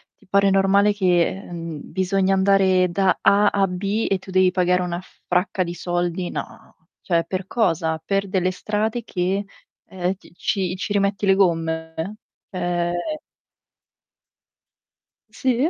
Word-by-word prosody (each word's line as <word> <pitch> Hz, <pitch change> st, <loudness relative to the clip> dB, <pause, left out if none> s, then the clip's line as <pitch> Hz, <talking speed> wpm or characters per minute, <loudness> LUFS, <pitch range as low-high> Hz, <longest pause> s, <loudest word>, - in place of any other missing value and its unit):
ti -, -, -26 dB
pare 200 Hz, 0 st, +3 dB
normale 195 Hz, +2 st, +4 dB
che, 180 Hz, -4 st, +3 dB
ehm, 170 Hz, -5 st, -7 dB
bisogna 190 Hz, 0 st, +1 dB
andare 190 Hz, -1 st, +4 dB
da 190 Hz, +1 st, +2 dB
"A" 205 Hz, +1 st, +5 dB
a 200 Hz, -1 st, +2 dB
"B" 195 Hz, +4 st, -2 dB
e 195 Hz, -, +1 dB
tu 190 Hz, -, -14 dB
devi 185 Hz, 0 st, +4 dB
pagare 180 Hz, 0 st, +2 dB
una 175 Hz, 0 st, -3 dB, 0.3 s
fracca 185 Hz, +1 st, +1 dB
di 170 Hz, -1 st, -5 dB
soldi? 175 Hz, 0 st, -2 dB
No. -, -, -8 dB, 0.3 s
Cioè, 170 Hz, -2 st, +1 dB
per 185 Hz, +1 st, -4 dB
cosa? 165 Hz, -8 st, 0 dB
Per 195 Hz, 0 st, 0 dB
delle 185 Hz, -1 st, +1 dB
strade 215 Hz, +5 st, -2 dB
che 190 Hz, 0 st, -1 dB, 0.4 s
ehm, 185 Hz, 0 st, -2 dB
ti 195 Hz, -, -19 dB
ci 185 Hz, -2 st, -1 dB
ci 205 Hz, +2 st, -3 dB
rimetti 200 Hz, 0 st, +1 dB
le 195 Hz, -, +5 dB
gomme? 165 Hz, 0 st, -1 dB, 0.3 s
Eh 175 Hz, -2 st, -1 dB, 2.4 s
Sì? 260 Hz, +3 st, +1 dB
185 Hz, 140 wpm, -22 LUFS, 175-200 Hz, 2.4 s, A